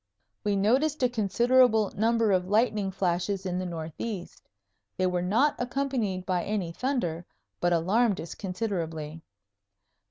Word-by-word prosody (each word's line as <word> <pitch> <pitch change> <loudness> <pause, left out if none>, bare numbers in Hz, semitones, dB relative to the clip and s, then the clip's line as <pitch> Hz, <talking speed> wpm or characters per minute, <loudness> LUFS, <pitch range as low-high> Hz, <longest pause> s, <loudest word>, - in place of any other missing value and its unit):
We 205 -1 +1
noticed 260 +9 +2
a 250 - +4
considerable 235 0 +3
number 225 0 +2
of 185 -1 +1
lightning 210 -1 +2
flashes 190 +1 -1
in 180 -1 -1
the 185 - -3
northeast. 175 +4 -6 0.6
They 185 - +1
were 180 -1 0
not 225 +12 +2
accompanied 245 -7 -1
by 180 -2 0
any 200 -5 -2
thunder, 175 - -2 0.4
but 175 - +1
alarmed 195 +6 +2
us 165 - -6
considerably. 165 -6 -4
200 Hz, 130 wpm, -28 LUFS, 180-230 Hz, 0.6 s, a